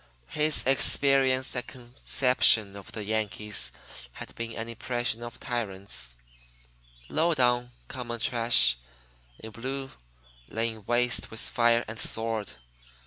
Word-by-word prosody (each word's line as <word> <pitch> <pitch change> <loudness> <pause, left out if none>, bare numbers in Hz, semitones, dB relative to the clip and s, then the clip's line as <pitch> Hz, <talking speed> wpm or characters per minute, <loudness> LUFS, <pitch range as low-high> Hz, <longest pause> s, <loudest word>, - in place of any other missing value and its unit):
His 150 0 +3
experience 135 0 +4
and 125 - -3
conception 120 -4 +1
of 100 -1 -10
the 110 - -5
Yankees 105 -1 -2 0.4
had - - -8
been 115 0 -5
an 110 0 -5
impression 120 0 -2
of 120 -1 -8
tyrants 95 - -3 0.9
"low 165 +1 +1
down, 125 -2 +2 0.2
common 120 -3 -6
trash" 115 - +4 0.6
in 110 - -10
blue, 135 +5 -5 0.6
laying 110 -1 -2
waste 120 0 +1
with 110 - -2
fire 120 0 +2
and 110 +1 -7
sword. 110 -7 -1
120 Hz, 115 wpm, -27 LUFS, 110-125 Hz, 0.9 s, experience